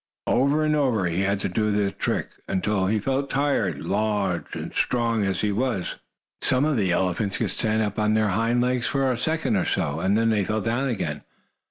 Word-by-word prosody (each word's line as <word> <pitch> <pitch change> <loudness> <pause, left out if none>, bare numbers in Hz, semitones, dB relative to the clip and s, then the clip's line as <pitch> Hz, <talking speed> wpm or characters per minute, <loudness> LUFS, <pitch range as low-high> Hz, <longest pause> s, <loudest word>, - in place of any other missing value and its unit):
Over 140 +4 +2
and 150 0 +2
over 125 -10 +1
he 85 +2 0
had 100 0 +1
to - - 0
do 105 +4 0
the 100 -1 +1
trick, 95 - -2 0.2
until 95 0 0
he 110 +3 +2
felt 135 +6 -1
tired, 135 - 0
large 100 -4 -1
and - - -6
strong 115 -3 +1
as 95 -2 -1
he 105 - +1
was. 115 -3 -1 0.4
Some 130 +2 +2
of 155 -1 +1
the 100 -6 +1
elephants 95 +3 0
could 110 -5 -1
stand 110 +2 0
up 105 0 -3
on 105 0 +2
their 110 -1 +2
hind 115 +5 +1
legs 125 -1 0
for 135 -2 +1
a - - 0
second 135 -1 0
or 90 - 0
so, 70 +3 -1
and 95 +4 +2
then 115 0 +2
they 105 -2 +2
fell 110 +3 -1
down 120 +5 0
again. 75 - -3
110 Hz, 210 wpm, -24 LUFS, 95-125 Hz, 0.4 s, Over